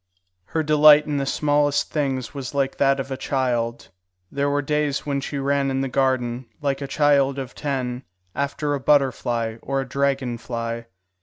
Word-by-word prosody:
Her 160 - -1
delight 150 0 +7
in 150 -1 -2
the 135 -1 -1
smallest 145 0 +1
things 135 -5 -2
was 140 -1 -6
like 135 -1 0
that 135 0 +3
of 135 0 -5
a - - -1
child. 120 -4 -1 0.4
There 140 0 0
were 145 0 0
days 150 -1 -1
when 140 -1 -1
she 140 - -4
ran 140 0 +1
in 135 0 -1
the 135 - -1
garden, 125 -2 0
like 140 -2 -1
a 140 - -3
child 140 -2 +3
of 130 -2 -5
ten, 130 -4 -3 0.3
after 145 +1 -2
a 140 - -1
butterfly 120 -5 +1
or 135 0 -2
a 135 - -3
dragon 135 -3 -1
fly. 115 -1 -4
135 Hz, 175 wpm, -23 LUFS, 130-145 Hz, 0.4 s, delight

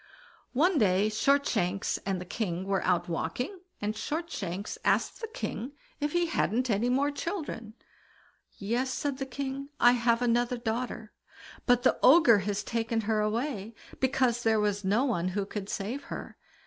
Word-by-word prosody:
One 320 +5 +3
day 200 0 +3
Shortshanks 215 -6 +1
and 190 -2 0
the 180 - -7
king 185 -2 -3
were 195 -1 0
out 180 -2 +1
walking, 210 - -3 0.2
and 210 +1 -1
Shortshanks 210 - -4
asked - - +1
the 450 - -3
king 290 - -5 0.3
if 295 0 -1
he 345 0 +3
hadn't 250 - 0
any 215 +4 +1
more 275 +3 +2
children? 285 - -5 0.8
"Yes", 240 +6 -1
said 280 0 -2
the 270 - -3
king, 275 +1 -4
"I 240 - +7
had 235 0 +2
another 240 +1 +2
daughter; 225 -1 -3 0.5
but 245 -1 +4
the - - +3
Ogre 255 -7 +7
has 205 +1 -2
taken 230 0 -1
her 220 0 0
away, 220 0 -2 0.2
because 255 -2 +2
there 225 -2 +3
was 205 -1 0
no 210 +8 +2
one 185 -10 0
who 200 - 0
could 200 0 -6
save 230 +8 -3
her. - - -7
235 Hz, 160 wpm, -29 LUFS, 205-265 Hz, 0.8 s, I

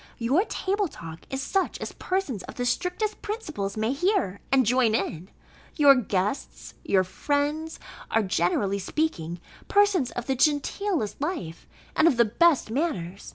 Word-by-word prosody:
Your 265 - +2
table 400 -1 -1
talk 165 - -10
is 265 0 -2
such 385 +6 0
as - - -5
persons 365 - -2
of - - -10
the 245 - -2
strictest 370 - -1
principles 310 - -4
may 220 +4 0
hear, 350 - 0
and 265 -2 +4
join 240 -1 +3
in: 185 -3 -3 0.5
your 285 -3 +8
guests, 205 -2 -2
and - - -9
your 190 -1 +6
friends 290 - -2 0.3
are, 225 - +2
generally 190 +2 +1
speaking, 180 - -2 0.3
persons 405 -10 +3
of 245 - -4
the 265 - 0
genteelest 295 - 0
life, 290 - -4 0.3
and 325 - +5
of 275 - +3
the 235 - +6
best 285 +2 +3
manners. 200 - -2
265 Hz, 155 wpm, -26 LUFS, 200-335 Hz, 0.5 s, your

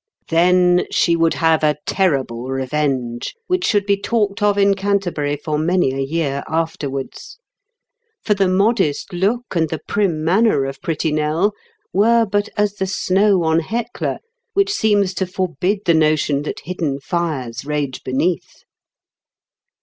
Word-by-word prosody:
Then 180 +1 +3
she 170 - +2
would 165 0 +2
have 160 -1 +2
a 150 -1 +2
terrible 135 -10 0
revenge, 130 - -2
which 365 -3 0
should 205 -3 +2
be 200 0 +1
talked 210 -2 0
of 205 -1 +2
in 200 0 +4
Canterbury 190 -7 -1
for 150 0 -2
many 170 -3 +1
a 135 - -4
year 140 0 -1
afterwards; 150 -4 -4 0.9
for 210 - +2
the 195 -2 +1
modest 185 -5 +1
look 210 +6 -1
and 160 -2 +1
the 160 - -3
prim 185 -7 0
manner 185 -3 +3
of 135 0 -6
pretty 160 -1 -1
Nell 155 +7 +1 0.4
were 230 +4 +4
but 205 0 -1
as 205 -1 +1
the 190 - -1
snow 190 0 +2
on 160 0 +2
Hecla, 230 +8 -3 0.4
which 400 +1 +2
seems 205 - +2
to 190 0 -2
forbid 185 +2 -1
the 170 - +4
notion 155 -2 +2
that 150 - -5
hidden 160 -5 -3
fires 135 -7 -3
rage 145 -2 -3
beneath. 165 +7 -2
170 Hz, 145 wpm, -19 LUFS, 150-200 Hz, 0.9 s, in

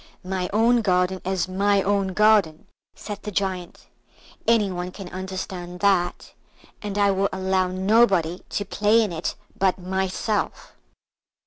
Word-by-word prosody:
"My 185 -1 -2
own 230 +3 +3
garden 185 -2 +1
is 190 -1 -1
my 200 +1 +2
own 195 -1 0
garden," 210 -7 +3 0.3
said 205 -1 -7
the 210 - -5
Giant; 185 -3 -3 0.6
"any 220 -4 +3
one 180 0 -4
can 185 0 -9
understand 185 -1 -6
that, 190 -3 +1 0.5
and 205 -1 -4
I 200 -1 +4
will 195 +1 +1
allow 190 0 0
nobody 190 -2 +2
to 205 - -2
play 210 +3 +3
in 210 - -2
it 165 +1 -3 0.2
but 190 -1 +1
myself." 190 +3 -2
190 Hz, 135 wpm, -24 LUFS, 185-205 Hz, 0.6 s, I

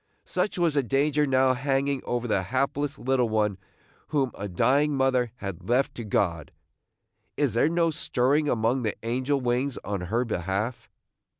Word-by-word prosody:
Such 210 - -1
was 170 -3 +2
the 145 - +3
danger 145 +3 +1
now 130 -1 +3
hanging 135 +1 0
over 120 0 -2
the 100 -4 +1
hapless 135 +7 -1
little 125 -2 +1
one 105 -3 0 0.5
whom 135 -4 0
a 100 - -5
dying 135 +10 +2
mother 130 -3 +2
had 100 -4 -7
left 130 +3 +2
to 120 - -6
God. 85 -7 -1 0.9
Is 145 -4 +1
there 120 +7 +3
no 170 0 +2
stirring 145 +1 +1
among 120 +3 +1
the 110 -3 -1
angel 130 +4 0
wings 125 +2 0
on 100 -2 -3
her 120 +4 +1
behalf? 100 +3 -3
130 Hz, 160 wpm, -26 LUFS, 115-140 Hz, 0.9 s, the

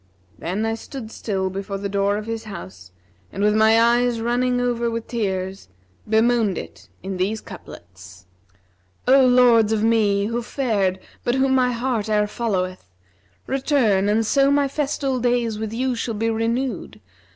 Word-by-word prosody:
Then 190 +6 -2
I 225 - 0
stood 225 0 -8
still 190 -5 -2
before 195 +1 -4
the 200 +1 -4
door 200 +1 0
of 210 - -5
his 225 0 -5
house 95 - -10 0.4
and 200 - -3
with 210 0 +3
my 220 +1 +5
eyes 240 0 +3
running 245 +2 0
over 240 -1 0
with 230 0 -4
tears, 190 - -3 0.4
bemoaned 220 -2 +2
it - - -9
in 190 0 -4
these 200 +4 -1
couplets, 95 - -13 0.8
'O 265 +1 +6
Lords 245 -3 +5
of 220 -1 +1
me, 210 -3 +2
who 230 +3 -2
fared 215 -7 -1 0.2
but 245 - 0
whom 265 0 +2
my 255 -1 +3
heart 235 -3 -2
e'er 210 -1 +2
followeth, 185 - -3 0.3
* 95 -2 -37
Return 255 -8 +1
and 220 +2 +2
so 275 +4 +3
my 280 0 +3
festal 275 -2 -1
days 240 -3 0
with 220 -1 -4
you 255 +3 -1
shall 230 -1 -3
be 225 +2 0
renewed! 230 +4 -2
225 Hz, 160 wpm, -22 LUFS, 200-245 Hz, 0.8 s, O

